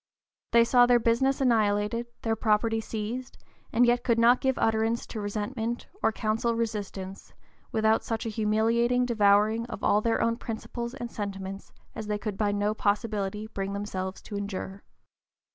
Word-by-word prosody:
They 235 0 +6
saw 245 +1 +5
their 245 0 +6
business 240 +4 +2
annihilated, 220 -1 +2 0.2
their 225 -1 +1
property 225 0 +1
seized, 225 +4 -5 0.3
and 245 +2 +4
yet 240 0 +2
could 235 -3 +2
not 235 +2 +5
give 265 -1 +1
utterance 225 +1 +1
to 220 - -6
resentment, 220 +3 -3 0.2
or - - +3
counsel 225 +2 0
resistance, 205 -4 -4 0.4
without 220 0 +2
such 225 -1 -3
a - - -1
humiliating 230 +3 +2
devouring 215 0 +3
of 240 - -8
all 210 - +3
their 230 +1 +1
own 230 0 +1
principles 235 +1 -5
and 240 -1 -6
sentiments 195 -1 -6 0.2
as 220 - -6
they 210 0 -1
could 205 -1 -4
by 205 0 +1
no 205 +1 0
possibility 210 -1 -1
bring 200 -2 -4
themselves 190 -2 -4
to 205 - -7
endure. 200 -1 -5
220 Hz, 160 wpm, -28 LUFS, 205-235 Hz, 0.4 s, They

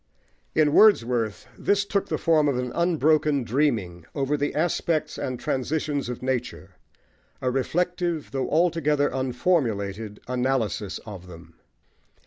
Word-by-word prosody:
In 150 -2 +3
Wordsworth 120 - +4
this 200 - +1
took 200 -1 -1
the - - -1
form 155 -3 +3
of 140 -3 +1
an 125 -1 -2
unbroken 155 -4 +2
dreaming 110 - -1
over 140 +1 0
the 145 0 -2
aspects 160 0 0
and 130 -2 -3
transitions 145 0 -2
of 125 0 -6
nature 125 -7 -3 0.7
a 125 - 0
reflective, 170 +4 -1
though 135 -1 -2
altogether 150 -3 +2
unformulated, 115 - -1
analysis 125 -5 -1
of 95 -5 -9
them. 85 -2 -13
135 Hz, 120 wpm, -25 LUFS, 115-155 Hz, 0.7 s, Wordsworth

